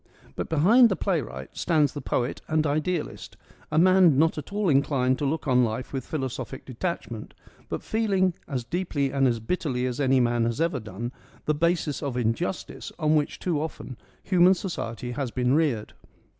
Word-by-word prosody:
But - - -4
behind 215 - +6
the 190 - +1
playwright 115 - -3
stands 155 -5 +2
the 145 - -5
poet 125 -1 -2
and 155 0 +1
idealist, 155 +3 -2 0.3
a 155 - 0
man 180 -3 +6
not 160 +3 +3
at 150 - -10
all 205 -1 0
inclined 135 -3 +2
to 145 - -1
look 155 +2 -2
on 125 -1 +4
life 120 +4 -3
with 135 -2 -4
philosophic 135 -3 -4
detachment, 125 -4 -5 0.3
but - - -4
feeling, 195 -5 +1
as 130 -6 -3
deeply 145 -2 -1
and 135 -1 +3
as 120 -2 0
bit 115 +12 -2
terly 125 -6 -1
as 125 +1 -4
any 135 -2 +3
man 120 -1 +2
has 115 +3 -2
ever 165 -4 +1
done, 110 +2 -6 0.3
the 150 - +2
basis 155 -2 0
of 140 -4 -3
injustice 125 +11 -2
on 155 -2 +2
which 150 -1 0
too 165 -5 -1
often 155 -4 -6 0.3
human 185 0 +5
society 125 - -4
has 135 0 -3
been 125 +1 +1
reared. 140 -9 +1
145 Hz, 180 wpm, -26 LUFS, 125-170 Hz, 0.3 s, behind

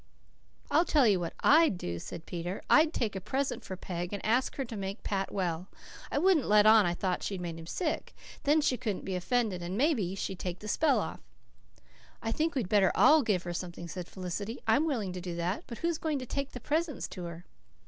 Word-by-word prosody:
"I'll 320 - +5
tell 295 -6 +3
you 200 -4 +4
what 170 -1 -4
I'D 310 - +6
do," 85 - -4
said 160 - -8
Peter. 175 +2 -5
"I'd 310 +1 +6
take 225 -10 -2
a 190 - -3
present 270 +8 -2
for 190 - -6
Peg, 175 -1 -5
and 200 -2 -5
ask 245 +4 +2
her 270 - -2
to 230 -1 -7
make 195 +1 -5
Pat 195 -1 -2
well. 180 -2 -2 0.4
I - - 0
wouldn't 340 -3 +3
let 210 0 +6
on 215 -3 +7
I 175 - 0
thought 180 0 -1
she'd 195 -2 -3
made 170 -2 -5
him 165 - -10
sick. 320 - -3 0.3
Then 300 +1 +3
she 260 -4 +1
couldn't 210 -6 -3
be 190 - -3
offended 205 0 0
and 175 +3 -4
maybe 235 - +1
she'd 190 -1 -4
take 180 -1 -4
the 210 - -9
spell 310 +9 +3
off." - - -4 1.0
"I 225 - -3
think 315 +5 0
we'd 245 -8 0
better 195 -2 +4
all 310 +1 +7
give 205 -8 0
her 175 - -4
something," 175 -1 -6
said 175 +1 -6
Felicity. 200 +5 -5
"I'm 225 +8 +3
willing 220 - -1
to 180 - -5
do 175 -1 -5
that. 175 +4 -2
But 235 - -7
who's 335 -1 -1
going 310 -3 -1
to 255 - -5
take 275 +2 -3
the 250 - -6
presents 305 +4 -1
to 180 -2 -7
her?" 170 0 -8
205 Hz, 225 wpm, -30 LUFS, 180-275 Hz, 1.0 s, on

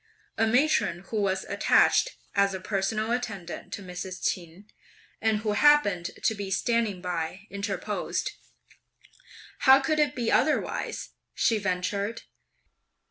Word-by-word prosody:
A 225 0 +2
matron, 245 - +2
who 215 -2 0
was 190 -1 0
attached - - +3 0.2
as 200 -1 +2
a - - -4
personal 210 +3 -1
attendant 205 -8 -4
(to 200 - -6
Mrs. 185 0 -6
Ch'in,) 175 +2 -3 0.6
and 220 -1 +1
who 215 -1 -1
happened 210 -8 +4
to - - +3
be 200 -2 -5
standing 215 -2 0
by 180 +2 -3
interposed: 200 0 -3 1.3
"How 265 0 +7
could 305 +3 0
it 295 -3 +2
be 235 -3 -1
otherwise?" 305 +3 0 0.3
she 225 -2 +2
ventured. 200 +3 -2
205 Hz, 125 wpm, -27 LUFS, 190-230 Hz, 1.3 s, How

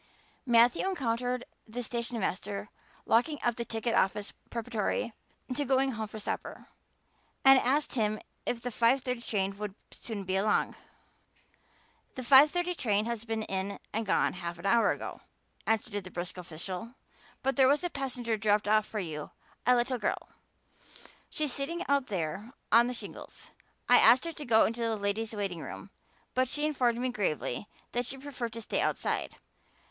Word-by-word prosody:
Matthew 240 +9 +5
encountered 250 -6 -1 0.2
the 245 +3 -4
stationmaster 215 -4 -3 0.4
locking 295 +7 +3
up 240 -1 +2
the 235 - -2
ticket 225 +1 -2
office 200 +2 +1 0.2
preparatory 230 0 -2 0.4
to 290 - +1
going 270 0 +2
home 220 -2 -4
for 215 - -8
supper, 210 - -5 0.8
and 270 0 +9
asked 285 +4 +1
him 215 -3 +1 0.2
if 235 - -2
the 245 - -2
five 240 +4 +3
thirty 250 -2 -2
train 195 -4 -1
would 210 -2 -4 0.2
soon 215 -4 -6
be 190 0 -1
along. 205 +2 +2 1.4
"The 255 - -5
five 275 +4 +8
thirty 355 +2 0
train 215 - +1
has 230 -1 -3
been 225 -1 -2
in 195 0 -3 0.2
and 225 - 0
gone - - +2
half 170 -1 -5
an 175 - -10
hour 230 +3 +4
ago," - - -3 0.5
answered 220 -1 +1
that 185 - -10
brisk 175 0 -3
official. 180 +6 -6 0.5
"But 270 +1 +1
there 265 -2 +6
was 290 +5 +3
a 355 - 0
passenger 250 -4 -2
dropped 210 0 +2
off 215 0 +3
for 215 - -4
you 155 -5 -5 0.4
a 250 - +7
little 245 +1 +1
girl. - - -2 1.0
She's 300 -4 -1
sitting 335 +6 -2
out 280 -2 +2
there 195 +5 -3 0.2
on 235 +2 +7
the 250 - -3
shingles. - - -8 0.4
I 245 - +8
asked 245 +7 +7
her 335 - -3
to 295 - -8
go 220 -2 +5
into 230 +2 -2
the 230 -1 +1
ladies' 210 +2 -1
waiting 195 -5 -2
room, - - -8 0.4
but 255 0 +2
she 295 +4 -1
informed 250 -6 +2
me 255 +1 0
gravely 200 - -2 0.2
that 245 0 -1
she 270 - -4
preferred 260 -4 -5
to 230 - -5
stay - - -1
outside. - - -1
230 Hz, 170 wpm, -30 LUFS, 210-255 Hz, 1.4 s, and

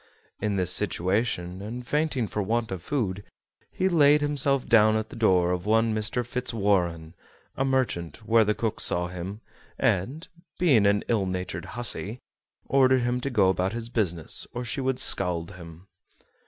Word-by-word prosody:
In 105 -2 -1
this 90 -2 +1
situation, 95 -1 -1
and 120 +4 -6
fainting 150 -3 0
for 105 - -3
want 115 +2 -1
of 95 -3 -4
food, 100 -5 -2 0.5
he 185 - -1
laid 150 -4 +5
himself 140 -2 0
down 110 -1 +5
at 110 0 -2
the - - -10
door 90 -6 +3
of 90 +2 -3
one 110 +1 +3
Mr. 110 +3 -2
Fitzwarren, 100 -10 -1 0.4
a 135 - 0
merchant, 120 -8 -1
where 115 0 +5
the 105 0 0
cook 110 -1 -2
saw 90 0 -1
him, 90 +4 -7 0.4
and, 135 - 0 0.3
being 130 - +4
an 100 0 +2
ill 105 -5 +1
natured 90 -2 -4
hussy, 115 -2 -1 0.5
ordered 130 -1 +4
him 120 +1 -1
to 140 - -2
go 105 -7 +3
about 95 +1 0
his 115 0 -5
business 90 - -1
or 120 +1 -3
she 130 +4 -3
would 130 -1 0
scald 90 -8 +1
him. 85 -1 -12
110 Hz, 165 wpm, -26 LUFS, 95-125 Hz, 0.5 s, laid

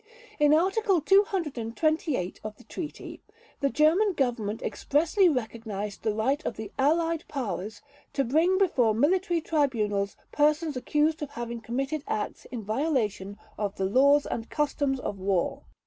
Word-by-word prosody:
In 295 0 +5
Article 380 +4 +3
228 310 - +1
of 215 0 -6
the - - -16
Treaty, 310 +2 -7 0.4
the 280 - +1
German 330 +9 +3
Government 235 - -1
expressly 335 +6 +2
recognized 220 -6 -4
the 215 -1 -1
right 265 +7 0
of - - -4
the 215 -2 -6
Allied 325 +3 +2
Powers 215 -6 -4 0.3
"to 275 - +1
bring 325 +9 +2
before 250 - +2
military 345 - +2
tribunals 215 -11 0
persons 300 +1 +2
accused 300 +5 +1
of 295 - -4
having 235 -2 -6
committed 270 +6 -3
acts 210 - -3
in 240 -4 -6
violation 215 -5 -1 0.2
of 205 -2 -2
the 190 - -1
laws 280 +8 +4
and 225 - -4
customs 285 -2 0
of 200 -5 -5
war". 190 -2 -1
275 Hz, 140 wpm, -27 LUFS, 220-315 Hz, 0.4 s, In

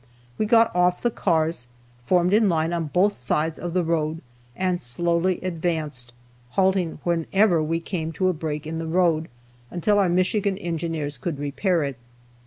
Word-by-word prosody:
We 215 - +1
got 230 -3 +4
off 180 0 +2
the 240 - +2
cars, 160 - 0 0.4
formed 180 +6 +3
in 215 -1 +4
line 165 0 0
on 170 -1 -1
both 185 +7 +2
sides 150 +5 -1
of 175 0 -5
the 180 - +2
road 160 -1 -1 0.3
and 185 -1 0
slowly 170 +8 +1
advanced, 160 -8 -3 0.5
halting 190 -3 +2
whenever 175 +1 +2
we 165 +2 -1
came 165 -2 -3
to 185 +4 0
a 185 - +2
break 155 -2 -4
in 160 +1 -4
the 165 - -4
road, 165 -2 +2 0.4
until 205 +4 +1
our 190 -3 +3
Michigan 190 +2 +1
Engineers 165 -6 -3
could 150 +2 -3
repair 150 +5 0
it. 140 -3 -4
170 Hz, 165 wpm, -24 LUFS, 160-185 Hz, 0.5 s, got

